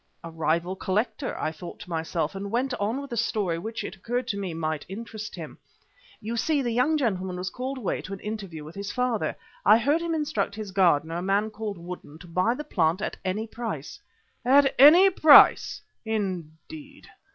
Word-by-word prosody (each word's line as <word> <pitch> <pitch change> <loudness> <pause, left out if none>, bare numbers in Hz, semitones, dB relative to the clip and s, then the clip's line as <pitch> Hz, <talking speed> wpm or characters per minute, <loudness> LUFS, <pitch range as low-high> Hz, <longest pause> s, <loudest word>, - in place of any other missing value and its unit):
"A 165 - -7
rival 165 +3 -1
collector," 215 +9 -2
I 155 - -1
thought 170 +2 -9
to - - -10
myself, 160 0 -2
and 200 +1 -5
went 250 +4 -1
on 220 +7 -1
with 280 -2 -9
the 235 - -3
story 205 -7 0
which, 225 +5 -5
it - - -6
occurred 240 +5 -3
to 205 - -1
me, 195 -3 -3
might 160 -2 -3
interest 215 +1 -7
him. - - -9 0.6
"You 230 +2 -4
see, 290 +3 +1
the 240 - -1
young 255 +7 +2
gentleman 190 -9 -1
was 180 +1 -4
called 260 +2 -4
away 225 -8 -2
to 195 - -8
an 195 - -6
interview 195 -7 -6
with 155 +2 -10
his 200 +2 -5
father. 250 -3 -1 0.3
I 210 +2 +7
heard 285 +8 +1
him 335 -1 -1
instruct 300 -9 -1
his 210 -2 -6
gardener, 170 -4 +2
a - - -3
man 200 +3 0
named 210 -3 -4
Woodden, 170 -3 -9
to 180 - -13
buy 185 +7 +1
the 300 - -5
plant 170 - +1
at - - -4
any 200 +4 -2
price." 230 +1 -6 0.4
"At 270 +2 +5
any 345 +8 +9
price! 310 -5 +6 0.2
Indeed. 215 - -5
210 Hz, 195 wpm, -26 LUFS, 180-250 Hz, 0.6 s, any